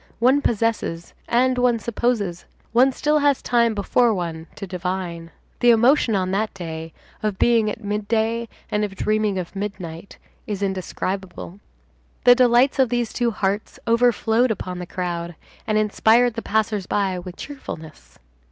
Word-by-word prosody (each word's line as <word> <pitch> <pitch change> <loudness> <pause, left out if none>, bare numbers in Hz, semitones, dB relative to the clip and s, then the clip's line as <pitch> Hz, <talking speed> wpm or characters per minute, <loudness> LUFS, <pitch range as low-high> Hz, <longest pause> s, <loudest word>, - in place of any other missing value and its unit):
One 260 +5 +4
possesses 225 -8 -1
and 255 +1 +2
one 245 -1 +3
supposes. 220 -5 -1 0.3
One 255 +3 +5
still 300 +3 +1
has 285 -2 +3
time 235 -2 +2
before 225 +3 +2
one 165 -2 -4
to 200 - -6
divine. 180 -2 -4 0.3
The 245 - +4
emotion 235 0 +4
on 185 -1 0
that 210 +3 0
day, 165 -3 -6 0.3
of 210 -3 -1
being 230 -3 +3
at 215 +2 -6
midday 220 +3 -1 0.2
and 210 0 +1
of 200 -2 -3
dreaming 215 -1 0
of 180 +1 -5
midnight 195 -3 -6 0.3
is 205 -2 -3
indescribable. 190 0 -4 0.6
The 245 - +8
delights 250 +2 +4
of 260 -3 +4
these 240 -1 -1
two 240 -2 +1
hearts 205 -1 -2
overflowed 235 0 +3
upon 185 -4 -4
the 180 - -6
crowd, 175 -2 -4 0.3
and 215 -1 +1
inspired 220 +3 +3
the 230 - -4
passers 215 -3 -1
by 190 -3 0
with 180 0 -9
cheerfulness. 165 - -9
215 Hz, 150 wpm, -22 LUFS, 185-235 Hz, 0.6 s, The